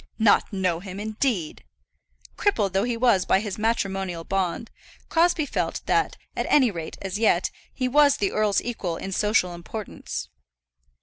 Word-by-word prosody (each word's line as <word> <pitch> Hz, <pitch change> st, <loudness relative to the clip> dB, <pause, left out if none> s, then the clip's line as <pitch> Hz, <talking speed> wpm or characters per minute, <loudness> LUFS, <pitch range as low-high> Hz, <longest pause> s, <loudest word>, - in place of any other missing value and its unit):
"Not 220 Hz, -2 st, +4 dB
know 185 Hz, -4 st, 0 dB
him, 190 Hz, +1 st, -8 dB
indeed!" 215 Hz, -, -2 dB, 0.7 s
Crippled 200 Hz, -, +1 dB
though 195 Hz, +3 st, +2 dB
he 240 Hz, -1 st, -1 dB
was 230 Hz, -6 st, +4 dB
by 190 Hz, -, +3 dB
his 210 Hz, 0 st, -5 dB
matrimonial 195 Hz, -6 st, -1 dB
bond, 195 Hz, +4 st, -2 dB, 0.4 s
Crosbie 335 Hz, -2 st, +3 dB
felt -, -, -2 dB
that, -, -, +1 dB, 0.2 s
at -, -, -2 dB
any 260 Hz, -6 st, +5 dB
rate 165 Hz, -4 st, -6 dB
as 195 Hz, +1 st, -3 dB
yet, 225 Hz, -, +2 dB, 0.2 s
he 255 Hz, -, -2 dB
was 285 Hz, +2 st, +5 dB
the 200 Hz, -, 0 dB
earl's 215 Hz, -2 st, +2 dB
equal 190 Hz, -8 st, -3 dB
in 195 Hz, -, -6 dB
social 205 Hz, -2 st, +2 dB
importance. 170 Hz, -, -6 dB
205 Hz, 150 wpm, -25 LUFS, 185-230 Hz, 0.7 s, any